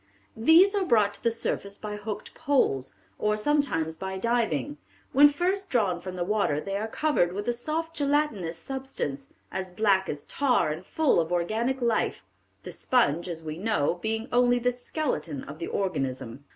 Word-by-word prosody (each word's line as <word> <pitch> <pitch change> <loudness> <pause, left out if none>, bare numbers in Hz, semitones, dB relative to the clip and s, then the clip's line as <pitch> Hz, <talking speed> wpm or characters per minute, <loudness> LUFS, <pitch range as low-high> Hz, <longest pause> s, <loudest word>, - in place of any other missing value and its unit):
"These 325 - +6
are 405 -2 +1
brought 215 - +3
to - - -10
the 235 - +4
surface 200 -3 -3
by 210 -1 -5
hooked 210 0 -6
poles, 195 - +1 0.2
or 210 0 +1
sometimes 215 - 0
by 190 +2 -4
diving. 240 +7 0 0.3
When 290 +2 +8
first 370 +6 -1
drawn 195 -8 +1
from 185 0 -6
the 175 - -1
water 195 -7 +1
they 195 +5 -4
are 210 +2 -1
covered 225 - +1
with 205 +3 -4
a 240 - +2
soft 320 +6 -3
gelatinous 280 - 0
substance, 260 - -4 0.2
as 190 -1 -3
black 195 0 +2
as 145 -1 -4
tar 255 - +1
and 160 +4 -5
full 305 - +2
of 165 0 -1
organic 225 +9 0
life, 235 -1 0 0.4
the - - -7
sponge, 175 - +1
as 165 -1 -5
we 155 +1 -5
know, 180 -5 0
being 220 +1 -2
only 245 0 +4
the 245 +1 +1
skeleton 245 - -3
of 145 +3 -9
the 170 - -4
organism." 135 -8 -3
215 Hz, 175 wpm, -27 LUFS, 175-265 Hz, 0.4 s, When